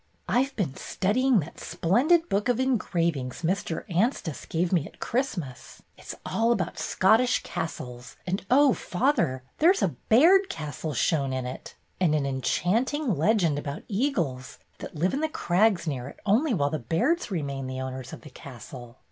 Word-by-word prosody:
"I 250 Hz, +2 st, +3 dB
Ve 275 Hz, -, -13 dB
been 170 Hz, -, -2 dB
studying 230 Hz, +3 st, +1 dB
that 160 Hz, -, -10 dB
splendid 295 Hz, -, +2 dB
book 205 Hz, 0 st, 0 dB
of 245 Hz, -1 st, +2 dB
engravings 170 Hz, -, -1 dB
Mr. 170 Hz, -1 st, -1 dB
Anstice 180 Hz, -, -1 dB
gave 170 Hz, +2 st, -1 dB
me 165 Hz, -4 st, +1 dB
at -, -, -18 dB
Christmas. 185 Hz, -, -4 dB
It -, -, -17 dB
's -, -, -5 dB
all 230 Hz, +1 st, +1 dB
about 180 Hz, -7 st, -1 dB
Scottish 225 Hz, +6 st, +3 dB
castles, 125 Hz, -6 st, -6 dB
and 190 Hz, +2 st, -2 dB
oh, 275 Hz, +1 st, +5 dB
father, 180 Hz, -, 0 dB, 0.2 s
there 330 Hz, +4 st, +6 dB
's 390 Hz, -, 0 dB
a -, -, +3 dB, 0.2 s
Baird 350 Hz, -, +6 dB
castle 150 Hz, -1 st, -5 dB
shown 140 Hz, +1 st, +1 dB
in 130 Hz, -1 st, -2 dB
it, 125 Hz, -, -8 dB, 0.2 s
and 170 Hz, -5 st, +3 dB
an 145 Hz, -2 st, 0 dB
enchanting 215 Hz, -, 0 dB
legend 165 Hz, -2 st, +2 dB
about 145 Hz, 0 st, -6 dB
eagles 185 Hz, -, -2 dB, 0.2 s
that -, -, -8 dB
live 170 Hz, +5 st, 0 dB
in 275 Hz, -, 0 dB
the 315 Hz, 0 st, 0 dB
crags 190 Hz, -, +2 dB
near 135 Hz, -5 st, -3 dB
it -, -, -11 dB
only 240 Hz, +9 st, +3 dB
while 145 Hz, -10 st, +1 dB
the 155 Hz, -, -2 dB
Bairds 240 Hz, -, 0 dB
remain 140 Hz, -7 st, -3 dB
the 130 Hz, 0 st, -5 dB
owners 130 Hz, -1 st, -6 dB
of -, -, -9 dB
the 150 Hz, -, -13 dB
castle." 125 Hz, -1 st, -11 dB
175 Hz, 175 wpm, -26 LUFS, -, 0.2 s, there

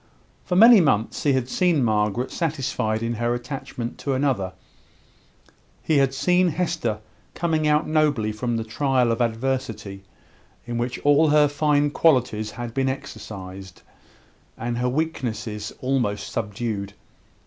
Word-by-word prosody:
For 180 Hz, -, -1 dB
many 225 Hz, +1 st, +8 dB
months 115 Hz, -8 st, +1 dB
he 145 Hz, -, +2 dB
had 130 Hz, -2 st, 0 dB
seen 170 Hz, -1 st, +2 dB
Margaret 110 Hz, +2 st, 0 dB
satisfied 130 Hz, -9 st, -1 dB
in 115 Hz, +1 st, -1 dB
her 120 Hz, 0 st, +1 dB
attachment 120 Hz, -1 st, -6 dB
to 140 Hz, -, -2 dB
another; 130 Hz, -9 st, 0 dB, 1.3 s
he 155 Hz, -3 st, +2 dB
had 135 Hz, -1 st, +3 dB
seen 180 Hz, +6 st, +2 dB
Hester 160 Hz, -9 st, -1 dB, 0.4 s
coming 160 Hz, -2 st, 0 dB
out 150 Hz, +1 st, +2 dB
nobly 150 Hz, -8 st, +1 dB
from 115 Hz, +2 st, -2 dB
the 115 Hz, -, -2 dB
trial 125 Hz, +1 st, +1 dB
of 115 Hz, -, -1 dB
adversity, 115 Hz, -4 st, -2 dB, 0.6 s
in 120 Hz, -1 st, -3 dB
which 120 Hz, +1 st, -2 dB
all 145 Hz, +2 st, +5 dB
her 150 Hz, 0 st, +5 dB
fine 145 Hz, 0 st, +1 dB
qualities 125 Hz, -9 st, +2 dB
had 120 Hz, +1 st, -7 dB
been 135 Hz, +1 st, +1 dB
exercised, 100 Hz, -8 st, -8 dB, 0.7 s
and 120 Hz, +1 st, -3 dB
her 125 Hz, 0 st, +1 dB
weaknesses 120 Hz, -8 st, -3 dB
almost 125 Hz, -6 st, -1 dB
subdued. 105 Hz, -2 st, -3 dB
125 Hz, 135 wpm, -23 LUFS, 110-145 Hz, 1.3 s, many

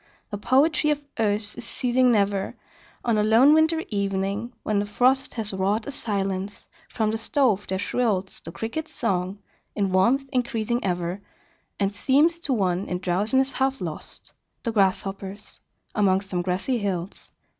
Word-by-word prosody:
The 205 Hz, -, -3 dB
poetry 295 Hz, +7 st, +3 dB
of 295 Hz, -1 st, 0 dB, 0.2 s
earth 210 Hz, -1 st, 0 dB
is -, -, -6 dB
ceasing 250 Hz, 0 st, +2 dB
never: 200 Hz, -3 st, +1 dB, 0.5 s
On 230 Hz, -3 st, +2 dB
a -, -, +3 dB
lone 230 Hz, +7 st, +6 dB
winter 320 Hz, +1 st, +3 dB
evening, 200 Hz, +2 st, -2 dB
when 210 Hz, -1 st, +1 dB
the 205 Hz, -, 0 dB
frost 255 Hz, +5 st, +2 dB
Has 215 Hz, -3 st, +4 dB
wrought 200 Hz, +3 st, 0 dB
a -, -, -5 dB
silence, 195 Hz, -5 st, -3 dB, 0.2 s
from 220 Hz, -2 st, 0 dB
the 220 Hz, -, -2 dB
stove 225 Hz, -5 st, +1 dB
there 190 Hz, -, -1 dB
shrills 200 Hz, -3 st, -1 dB
The 165 Hz, -, -6 dB
Cricket's 265 Hz, -, -5 dB
song, 190 Hz, -3 st, -1 dB, 0.4 s
in 200 Hz, -2 st, 0 dB
warmth 235 Hz, +9 st, +3 dB
increasing 240 Hz, -1 st, -1 dB
ever, 180 Hz, +1 st, -2 dB, 0.6 s
And 200 Hz, 0 st, 0 dB
seems 295 Hz, +10 st, +3 dB
to 295 Hz, -, -3 dB
one 190 Hz, -4 st, 0 dB
in 180 Hz, -, -2 dB
drowsiness 210 Hz, +10 st, +1 dB
half 265 Hz, 0 st, 0 dB
lost, 165 Hz, -4 st, -7 dB, 0.3 s
The 230 Hz, -, -1 dB
Grasshopper's 195 Hz, -1 st, -1 dB, 0.3 s
among 195 Hz, -3 st, +3 dB
some 190 Hz, -3 st, -3 dB
grassy 190 Hz, +8 st, -1 dB
hills. 190 Hz, -3 st, -4 dB
210 Hz, 155 wpm, -25 LUFS, 195-250 Hz, 0.6 s, lone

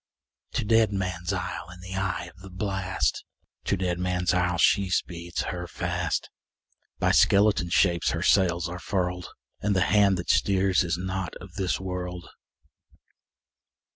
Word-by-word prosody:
To -, -, -1 dB
Deadman's 95 Hz, -5 st, +1 dB
Isle, 90 Hz, -2 st, -4 dB
in 90 Hz, +1 st, -12 dB
the 95 Hz, +1 st, -8 dB
eye 85 Hz, -2 st, -2 dB
of -, -, -20 dB
the 95 Hz, -, -10 dB
blast, 95 Hz, 0 st, -1 dB, 0.4 s
To 100 Hz, -, +1 dB
Deadman's 90 Hz, 0 st, 0 dB
Isle, 90 Hz, -1 st, +1 dB
she 95 Hz, +2 st, +3 dB
speeds 85 Hz, -1 st, -2 dB
her 90 Hz, 0 st, -4 dB
fast; 85 Hz, -2 st, -2 dB, 0.7 s
By -, -, +2 dB
skeleton 100 Hz, -3 st, +4 dB
shapes 85 Hz, -1 st, +3 dB
her -, -, -2 dB
sails 90 Hz, -3 st, +3 dB
are 90 Hz, +1 st, -6 dB
furled, 90 Hz, -2 st, -2 dB, 0.3 s
And 105 Hz, 0 st, +1 dB
the 90 Hz, -, +2 dB
hand 100 Hz, 0 st, +4 dB
that 90 Hz, -, 0 dB
steers 95 Hz, -1 st, +2 dB
is 85 Hz, -1 st, -1 dB
not 95 Hz, 0 st, -4 dB
of 95 Hz, -1 st, -11 dB
this 95 Hz, -2 st, -1 dB
world! 90 Hz, -2 st, -5 dB
90 Hz, 140 wpm, -26 LUFS, 90-95 Hz, 0.7 s, skeleton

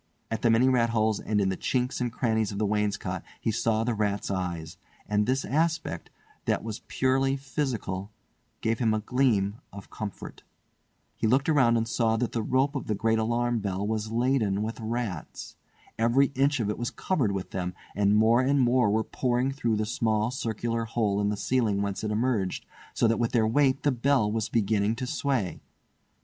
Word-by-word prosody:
At 110 Hz, -1 st, -2 dB
the 120 Hz, -, +3 dB
many 115 Hz, +3 st, +4 dB
rat 120 Hz, -3 st, +3 dB
holes 110 Hz, -2 st, +1 dB
and 105 Hz, -1 st, -1 dB
in 95 Hz, -1 st, +2 dB
the 95 Hz, -, -1 dB
chinks 125 Hz, +5 st, -1 dB
and 120 Hz, -1 st, -1 dB
crannies 110 Hz, -3 st, 0 dB
of 100 Hz, -, -5 dB
the 105 Hz, -, +1 dB
wainscot 100 Hz, -3 st, -1 dB, 0.2 s
he 115 Hz, -, 0 dB
saw 115 Hz, 0 st, +1 dB
the 120 Hz, +1 st, 0 dB
rats' 105 Hz, -2 st, -1 dB
eyes; 85 Hz, -3 st, -4 dB, 0.3 s
and 105 Hz, 0 st, +1 dB
this 130 Hz, +1 st, 0 dB
aspect, 155 Hz, -, -1 dB, 0.4 s
that -, -, 0 dB
was 110 Hz, -1 st, -5 dB
purely 135 Hz, +1 st, +1 dB
physical, 125 Hz, -8 st, -3 dB, 0.5 s
gave 115 Hz, -1 st, 0 dB
him 110 Hz, -3 st, +2 dB
a -, -, 0 dB
gleam 110 Hz, -3 st, +1 dB
of 100 Hz, -1 st, -11 dB
comfort. 105 Hz, -3 st, -7 dB, 0.8 s
He -, -, 0 dB
looked 130 Hz, +5 st, +2 dB
around 130 Hz, -6 st, +4 dB
and 115 Hz, 0 st, -1 dB
saw 115 Hz, -1 st, +1 dB
that 120 Hz, +1 st, -1 dB
the 115 Hz, -, -1 dB
rope 130 Hz, +5 st, +1 dB
of 135 Hz, -, -4 dB
the 105 Hz, -, 0 dB
great 110 Hz, +2 st, +1 dB
alarm 120 Hz, +1 st, 0 dB
bell 100 Hz, -1 st, -2 dB
was 110 Hz, 0 st, -2 dB
laden 115 Hz, -4 st, +1 dB
with 110 Hz, +2 st, -4 dB
rats. 110 Hz, -7 st, -4 dB, 0.4 s
Every 125 Hz, +5 st, +3 dB
inch 140 Hz, +1 st, +2 dB
of 110 Hz, -, 0 dB
it 105 Hz, -, -3 dB
was 120 Hz, -, -1 dB
covered 135 Hz, -, 0 dB
with 95 Hz, -2 st, -4 dB
them, 90 Hz, -1 st, -3 dB, 0.2 s
and 100 Hz, +1 st, +3 dB
more 115 Hz, +3 st, +5 dB
and 140 Hz, +2 st, +2 dB
more 125 Hz, -3 st, +3 dB
were 110 Hz, +2 st, +2 dB
pouring 125 Hz, +2 st, 0 dB
through 125 Hz, -5 st, 0 dB
the 105 Hz, 0 st, 0 dB
small 110 Hz, 0 st, 0 dB
circular 115 Hz, -2 st, -2 dB
hole 110 Hz, -3 st, 0 dB
in 100 Hz, -, +1 dB
the 105 Hz, -, -2 dB
ceiling 105 Hz, -2 st, +1 dB
whence 100 Hz, 0 st, -3 dB
it 110 Hz, -, -1 dB
emerged, 105 Hz, -3 st, -1 dB, 0.3 s
so 115 Hz, -, +3 dB
that 115 Hz, -1 st, +1 dB
with 120 Hz, -1 st, 0 dB
their 115 Hz, -3 st, +3 dB
weight 135 Hz, +4 st, +2 dB
the 145 Hz, -, +3 dB
bell 125 Hz, -3 st, +2 dB
was 110 Hz, -1 st, -1 dB
beginning 110 Hz, -1 st, +1 dB
to 130 Hz, +2 st, -4 dB
sway. 135 Hz, -, -1 dB
115 Hz, 195 wpm, -27 LUFS, 105-125 Hz, 0.8 s, more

